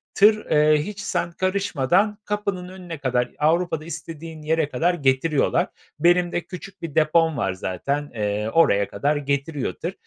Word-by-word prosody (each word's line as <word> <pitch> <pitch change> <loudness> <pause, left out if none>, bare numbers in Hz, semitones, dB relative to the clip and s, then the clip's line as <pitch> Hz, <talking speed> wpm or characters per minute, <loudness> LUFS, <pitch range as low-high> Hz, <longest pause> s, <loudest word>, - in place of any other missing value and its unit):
Tır, 215 +1 +5
eee, 150 0 +4
hiç 210 +4 -7
sen 170 -4 -2
karışmadan 185 +1 +1
kapının 200 -3 -2
önüne 180 -3 -8
kadar, 125 -3 0
Avrupa'da 160 0 +1
istediğin 165 -1 -8
yere 155 -1 0
kadar 170 +8 +1
getiriyorlar. 140 0 +1 0.3
Benim 175 +1 +3
de 175 - -1
küçük 180 +2 -10
bir 165 -4 -6
depom 160 0 +3
var 95 -5 0
zaten, 140 +11 -3
eee, 105 0 -1
oraya 100 -12 +4
kadar 145 +2 0
getiriyor 140 0 -2
tır. 175 +3 -5
160 Hz, 150 wpm, -23 LUFS, 140-180 Hz, 0.3 s, Tır